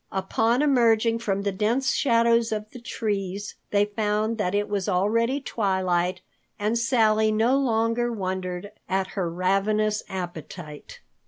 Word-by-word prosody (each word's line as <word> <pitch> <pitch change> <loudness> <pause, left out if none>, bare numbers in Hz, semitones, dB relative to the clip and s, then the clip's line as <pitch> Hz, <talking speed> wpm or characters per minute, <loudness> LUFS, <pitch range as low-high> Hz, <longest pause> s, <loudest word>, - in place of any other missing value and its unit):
Upon 225 +7 +1
emerging 230 -4 +3
from 200 -3 -1
the 200 - 0
dense 220 +7 +1
shadows 230 -2 +3
of 215 0 -4
the 250 - -10
trees, 205 -4 -3 0.2
they 205 0 +3
found 215 +1 -1
that 185 -1 0
it 205 0 0
was 200 -1 -2
already 230 +8 +1
twilight 185 -7 0 0.4
and 210 +2 0
Sally 220 -2 +3
no 225 +4 +3
longer 240 -2 +1
wondered 185 -2 -4 0.2
at 190 0 0
her 190 -4 -2
ravenous 205 +4 +1
appetite. 175 -4 -7
210 Hz, 135 wpm, -25 LUFS, 190-230 Hz, 0.4 s, emerging